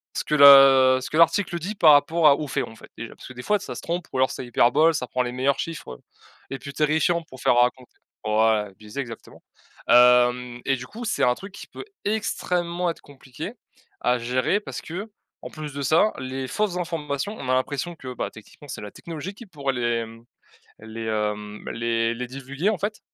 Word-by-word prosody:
ce - - -1
que 150 - 0
l'a 135 -2 +8
ce - - -6
que - - -5
l'article 175 +1 +3
dit 200 +6 -5
par 155 -5 +7
rapport 155 +3 +4
à 140 - +7
aux 150 - -5
faits, - - -2
en 110 - -13
fait, - - -15
déjà, 115 - -8
parce - - -12
que, - - -9
des 125 - -8
fois, 210 - +2
ça - - -7
se - - -7
trompe 175 +1 -3
ou - - -2
alors 130 0 +2
ça - - -6
hyperbole. 140 +7 +3
Ça 125 -4 -3
prend 125 - -1
les 120 - -4
meilleurs 135 +2 0
chiffres, 165 -1 -5
heu, 60 - -13 0.5
les 135 - -5
plus 140 +2 -9
terrifiants 160 +3 +1
pour 130 - -12
faire - - +3
raconter 125 +1 +1 0.3
pour 110 0 0
ouais, 105 -3 +1
biaisé, 105 +5 -9
exactement. 115 -3 -11 0.5
Hem 125 0 +5
et 135 - +2
du 125 +1 -9
coup, 235 +3 -8
c'est - - -2
un 125 0 +3
truc 195 0 -11
qui - - -10
peut - - -10 0.2
extrêmement 180 -5 -1
être 165 - -6
compliqué 140 - -9 0.5
à 125 0 +2
gérer 125 - 0
parce - - -7
qu'en 200 +6 -10
plus 150 -2 -7
de 140 - -4
ça, 170 +9 +3
les 130 0 -5
fausses 205 - -1
informations, 165 +2 -3
on - - -7
a - - +3
l'impression 140 +6 -1
que, 130 -4 -8
bah, - - -4
techniquement, 110 +7 -15
c'est - - -7
la 105 - -7
technologie 170 +3 -7
qui 235 - -12
pourrait 140 -6 -3
les, 120 -2 -1
mmh, 115 +1 -15 0.6
les, 110 +1 -7
hem, 105 -1 -3
les 115 0 0
les 125 +1 -5
divulguer, 140 +7 -3
en 205 - -2
fait, 210 +2 -4
135 Hz, 220 wpm, -24 LUFS, 125-170 Hz, 0.6 s, l'a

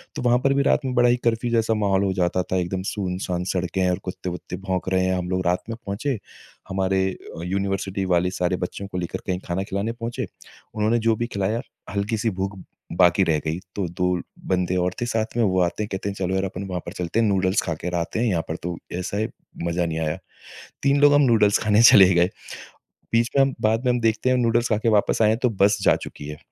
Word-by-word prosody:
तो - - -3
वहाँ 120 0 +3
पर 135 - +3
भी 140 0 +2
रात 145 +1 +2
में 130 - -1
बड़ा 120 -1 +5
ही 120 - +4
कर्फ़्यू 115 +1 +1
जैसा 115 -1 +2
माहौल 100 -2 +1
हो 95 -1 +1
जाता 90 -1 0
था, 95 - -2
एकदम 90 +1 -2
सुनसान 90 -2 -2
सड़कें 90 0 -1
हैं 90 - +3
और 90 - -1
कुत्ते-वुत्ते 90 0 -6
भौंक 95 -1 -1
रहे 95 0 +3
हैं। 95 0 +1
हम 90 -1 -3
लोग 95 0 -1
रात 90 +1 +1
में 115 - -4
पहुँचे। 115 +7 -2 0.5
हमारे 95 0 +1 0.4
यूनिवर्सिटी 95 +1 -2
वाले 90 +1 +3
सारे 90 0 0
बच्चों 95 +2 -5
को 95 - -6
लेकर 85 -2 -3
कहीं 90 -1 -1
खाना 90 +2 -2
खिलाने 100 +3 -2
पहुँचे। 115 0 -4 0.5
उन्होंने 110 +2 +2
जो 115 0 +2
भी 120 +2 -2
खिलाया, 105 +1 -1 0.3
हल्की-सी 105 +3 -1
भूख 95 +1 -3 0.4
बाकी 90 +1 +5
रह 80 -4 +2
गई। 80 +2 -1 0.2
तो 100 -3 -1
2 90 +2 0 0.3
बंदे 90 -1 +1
और 90 0 0
थे - - +1
साथ 115 -2 -2
में। 120 - +3
वो 95 -3 +2
आते 90 +4 0
हैं, - - -4
कहते 95 +1 -3
हैं, 100 - -5
"चलो 95 -1 -1
यार, 95 - 0
अपन 95 0 -5
वहाँ 90 -2 -3
पर 85 - -6
चलते 90 +3 -2
हैं, 115 - +3
नूडल्स 95 0 +2
खाकर 85 +1 -3
आते 85 +5 -2
हैं। 120 - +2
यहाँ 90 -6 +1
पर 80 - -3
तो 90 0 -3 0.2
ऐसा 95 +2 -3
है, 110 +1 0 0.4
मज़ा 85 +1 0
नहीं 80 -1 -2
आया।" 80 +1 -1 0.7
3 140 +1 +3
लोग 145 0 +7
हम 145 - +5
नूडल्स 110 -5 +4
खाने 105 +1 +4
चले 95 -5 +9
गए। 85 +1 +4 0.8
बीच 115 +1 +3
में 135 - +6
हम 135 -1 +1
बाद 110 +3 +2
में 125 - +4
हम 120 - 0
देखते 115 +2 +1
हैं 130 - +3
नूडल्स 120 -1 +2
खा 110 - +2
के 115 - 0
वापस 105 +1 +2
आए 105 - +5
हैं 110 +1 +2
तो 125 - +4
बस 100 +1 +4
जा - - +5
चुकी 75 - -9
है, 75 - -6
95 Hz, 240 wpm, -23 LUFS, 90-115 Hz, 0.8 s, चले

